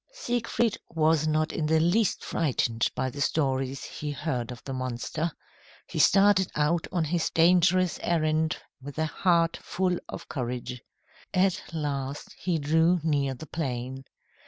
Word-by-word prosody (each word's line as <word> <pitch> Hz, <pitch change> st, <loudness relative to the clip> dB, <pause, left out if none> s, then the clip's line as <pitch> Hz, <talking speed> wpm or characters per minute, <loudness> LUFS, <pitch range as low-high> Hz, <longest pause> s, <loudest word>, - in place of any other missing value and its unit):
Siegfried 235 Hz, -, -1 dB
was 155 Hz, -1 st, +2 dB
not 155 Hz, +1 st, +1 dB
in 155 Hz, -, -1 dB
the 160 Hz, +1 st, +3 dB
least 180 Hz, +6 st, +2 dB
frightened 120 Hz, -7 st, 0 dB
by 130 Hz, -, 0 dB
the 140 Hz, -, -6 dB
stories 135 Hz, -2 st, 0 dB
he 150 Hz, -, -6 dB
heard 135 Hz, -5 st, -3 dB
of 120 Hz, -, -9 dB
the 135 Hz, -, -5 dB
monster. 130 Hz, +6 st, -2 dB, 0.5 s
He -, -, -5 dB
started 195 Hz, -2 st, +5 dB
out 150 Hz, +3 st, +1 dB
on 175 Hz, -3 st, +1 dB
his 165 Hz, +2 st, 0 dB
dangerous 180 Hz, +1 st, +4 dB
errand 155 Hz, -1 st, +1 dB, 0.2 s
with 140 Hz, +2 st, -9 dB
a 160 Hz, -, +1 dB
heart 170 Hz, +1 st, +2 dB
full 180 Hz, -1 st, -1 dB
of -, -, -7 dB
courage. 125 Hz, -2 st, -4 dB, 0.5 s
At 190 Hz, 0 st, +3 dB
last, 145 Hz, -3 st, -3 dB
he 175 Hz, -3 st, 0 dB
drew 160 Hz, +4 st, +3 dB
near 140 Hz, -4 st, +1 dB
the 145 Hz, -, -9 dB
plain. 130 Hz, -3 st, -4 dB
155 Hz, 145 wpm, -27 LUFS, 135-175 Hz, 0.5 s, started